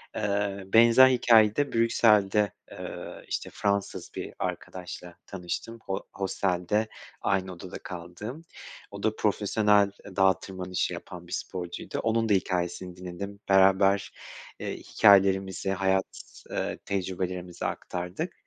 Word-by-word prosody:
Eee, 100 -2 -1
benzer 115 +3 +8
hikâyede 120 +1 +4
Brüksel'de, 105 -3 +3 0.2
eee, - - -8
işte - - -3
Fransız 100 -1 -1
bir - - -5
arkadaşla 90 -1 -6
tanıştım 95 +5 -5
ho 95 0 -3
hostelde 95 +2 0 0.3
aynı 95 -1 0
odada 90 +1 -8
kaldığım. 90 - -7 0.5
O 100 0 -8
da 110 0 +1
profesyonel, 105 -1 +3
eee, 100 - -11
dağa 95 -2 +4
tırmanışı 90 -2 -3
yapan 90 -1 -9
bir - - -14
sporcuydu. 90 -2 -5
Onun 115 0 +1
da - - +5
hikâyesini 90 -1 -1
dinledim. 90 +3 -7
Beraber, 95 +1 +4 0.5
eee, - - -4
hikâyelerimizi, 95 -2 +3
hayat, 95 0 0 0.3
eee, - - -2
tecrübelerimizi 90 -2 -3
aktardık. 90 - -4
95 Hz, 115 wpm, -27 LUFS, 90-105 Hz, 0.5 s, benzer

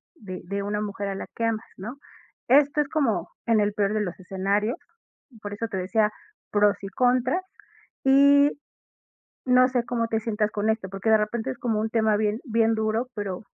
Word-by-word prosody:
de 190 - -8
de 200 +3 -3
una 205 +1 -2
mujer 200 -1 -4
a 195 - -3
la - - -5
que 230 - -1
amas, 225 -1 -1
no? 220 +7 -7 0.5
Esto 285 +3 +5
es 285 - -3
como 275 -9 0 0.2
en 230 -2 +3
el 205 0 +1
peor 205 0 0
de 215 - 0
los 185 -3 -4
escenarios, 200 - -1 0.6
por 205 - -6
eso 230 +3 -3
te 200 - -6
decía 210 +4 +1 0.4
pros 205 -1 +3
y 195 - -5
contras, 250 - +2 0.6
y 280 +1 +6 1.0
no 255 0 +5
sé 250 -2 0
cómo 235 -1 -1
te 225 - 0
sientas 215 -1 -1
con 215 +1 0
esto, 220 -3 -2
porque, 195 +3 -1
de 220 - +6
repente 220 +4 -2
es 255 - -6
como 225 -3 -1
un 220 +1 -2
tema 220 -2 +2
bien 210 +1 0
bien 225 -3 +2
duro, 220 +3 -1
pero, 200 -3 -4
220 Hz, 195 wpm, -25 LUFS, 205-240 Hz, 1.0 s, y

